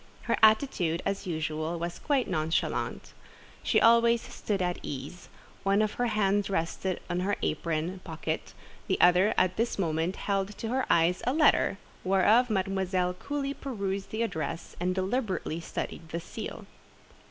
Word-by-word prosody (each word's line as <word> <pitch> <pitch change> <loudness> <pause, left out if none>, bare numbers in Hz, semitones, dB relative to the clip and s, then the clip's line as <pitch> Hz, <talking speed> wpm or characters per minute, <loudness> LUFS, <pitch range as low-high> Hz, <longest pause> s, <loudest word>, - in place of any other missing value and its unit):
Her - - +1
attitude, 215 - +3
as 195 0 -2
usual, 155 0 -2
was 170 +1 -4
quite 280 -4 +1
nonchalante. 160 -2 -1 0.5
She - - +3
always 235 0 +5
"stood 205 -3 -3
at 180 -1 -1
ease;" 145 +6 -7 0.3
one 195 +1 +2
of 215 - 0
her 245 - +3
hands 205 -2 +1
rested 185 +1 -1
in 175 0 -1
her 195 +3 0
apron 165 +3 -1
pocket, 160 -3 -4 0.3
the - - 0
other 180 +4 +5
at 185 0 +2
this 230 +2 0
moment 165 0 0
held 200 0 -2
to 225 - -4
her 260 +2 0
eyes 170 +2 +3
a 255 - +3
letter, 300 -9 +4 0.3
whereof 205 +6 +4
Mademoiselle 190 -2 0
coolly 280 +7 -3
perused 200 -9 -4
the 220 +2 -1
address, 165 -6 -4
and 180 +1 0
deliberately 190 -4 -1
studied 165 0 -5
the 170 - -3
seal. 180 +6 -7
190 Hz, 150 wpm, -29 LUFS, 170-215 Hz, 0.5 s, always